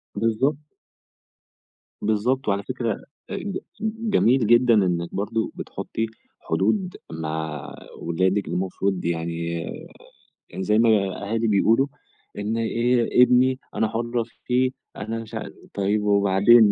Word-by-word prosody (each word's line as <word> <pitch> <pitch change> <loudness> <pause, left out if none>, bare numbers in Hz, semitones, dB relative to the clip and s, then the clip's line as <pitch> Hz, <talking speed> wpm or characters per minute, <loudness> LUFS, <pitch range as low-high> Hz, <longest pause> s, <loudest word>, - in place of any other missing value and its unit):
بالضبط. 115 +6 +1 1.5
بالضبط. 110 +5 +1
وعلى 100 0 +1
فكرة 120 -2 -3 0.3
ج 200 -1 -3 0.2
جميل 215 - +2
جدًا 120 +1 +5
إنِك 90 -4 +1
برضو 110 +3 -1
بتحطي 115 - -4 0.3
حدود 185 - 0 0.2
مع 80 -2 -4 0.2
ولادِك، 95 +3 0
المفروض 95 +1 -1
يعني 85 0 -2 1.0
يعني 95 - -5
زي 105 +2 +3
ما 115 0 +5
الأهالي 105 +2 +1
بيقولوا، 110 +6 +4 0.5
إن 105 +2 -1 0.7
ابني 125 +1 +4 0.2
أنا 110 - +1
حرة 120 +1 -1 0.2
فيه 130 +1 +2 0.3
أنا 110 +3 -4
مش 110 - -12
عا - - -4 0.2
طيب 100 +1 +1
وبعدين 100 +2 +5
110 Hz, 110 wpm, -24 LUFS, 95-120 Hz, 1.5 s, جدًا